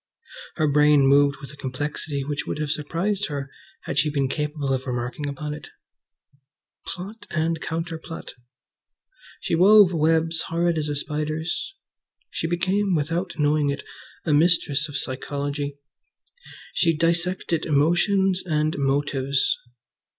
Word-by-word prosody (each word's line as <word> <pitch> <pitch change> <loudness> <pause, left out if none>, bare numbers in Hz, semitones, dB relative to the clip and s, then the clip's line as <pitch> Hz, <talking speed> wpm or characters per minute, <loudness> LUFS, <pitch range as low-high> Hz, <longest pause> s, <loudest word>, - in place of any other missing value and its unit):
Her 155 - +2
brain 150 -1 +5
moved 140 +1 +5
with 140 -1 -9
a - - -12
complexity 140 +1 -3
which 145 +1 -3
would - - -2
have 150 -1 -2
surprised 185 +8 -1
her 140 -2 -5 0.3
had 140 - -1
she 150 +2 +2
been 140 -2 0
capable 150 -1 -2
of 130 +1 -3
remarking 125 +4 -3
upon 150 +2 -4
it. 150 -1 -9 1.2
Plot 205 +4 -7
and 165 0 -1
counterplot! 165 0 -5 1.1
She - - -2
wove 190 +2 +7
webs 160 +1 +2
horrid 170 0 +1
as 150 -1 -2
a 145 - -1
spider's. 155 - -3 0.6
She - - -2
became, 185 +3 +1
without 165 +4 -2
knowing 150 -1 +2
it, 140 - -3 0.4
a 155 - +2
mistress 150 -2 +3
of 145 - -3
psychology. 140 +2 -3 1.0
She 165 -3 +2
dissected 170 0 0
motions 180 +6 +3
and 155 -3 0
motives. 140 -1 +1
150 Hz, 130 wpm, -24 LUFS, 145-170 Hz, 1.2 s, wove